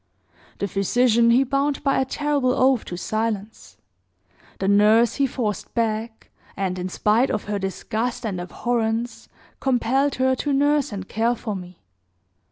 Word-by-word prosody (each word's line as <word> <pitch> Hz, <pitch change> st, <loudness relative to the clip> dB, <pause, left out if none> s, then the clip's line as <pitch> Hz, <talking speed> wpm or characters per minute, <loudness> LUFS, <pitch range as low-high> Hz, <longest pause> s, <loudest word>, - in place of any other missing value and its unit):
The 200 Hz, -, -2 dB
physician 235 Hz, +4 st, +2 dB
he 245 Hz, +3 st, +5 dB
bound 275 Hz, +1 st, -1 dB
by 275 Hz, -, +2 dB
a -, -, 0 dB
terrible 285 Hz, -2 st, 0 dB
oath 260 Hz, -2 st, +2 dB
to 175 Hz, -, -6 dB
silence; 215 Hz, +1 st, -4 dB, 0.8 s
the 190 Hz, -, -2 dB
nurse 210 Hz, +3 st, +4 dB
he 275 Hz, -1 st, +2 dB
forced 215 Hz, -7 st, -3 dB
back, 220 Hz, 0 st, -2 dB, 0.3 s
and, 185 Hz, -2 st, -2 dB
in 180 Hz, +1 st, -3 dB
spite 215 Hz, +7 st, +2 dB
of 215 Hz, -, -2 dB
her 205 Hz, -1 st, -3 dB
disgust 220 Hz, +5 st, -3 dB
and 190 Hz, -5 st, -3 dB
abhorrence, 230 Hz, +4 st, -2 dB, 0.3 s
compelled 265 Hz, +2 st, +1 dB
her 260 Hz, 0 st, +2 dB
to 290 Hz, +2 st, -1 dB
nurse 290 Hz, 0 st, +2 dB
and 190 Hz, -2 st, -6 dB
care 230 Hz, +2 st, 0 dB
for 215 Hz, -3 st, -5 dB
me. 180 Hz, -, -10 dB
230 Hz, 150 wpm, -23 LUFS, 205-260 Hz, 0.8 s, he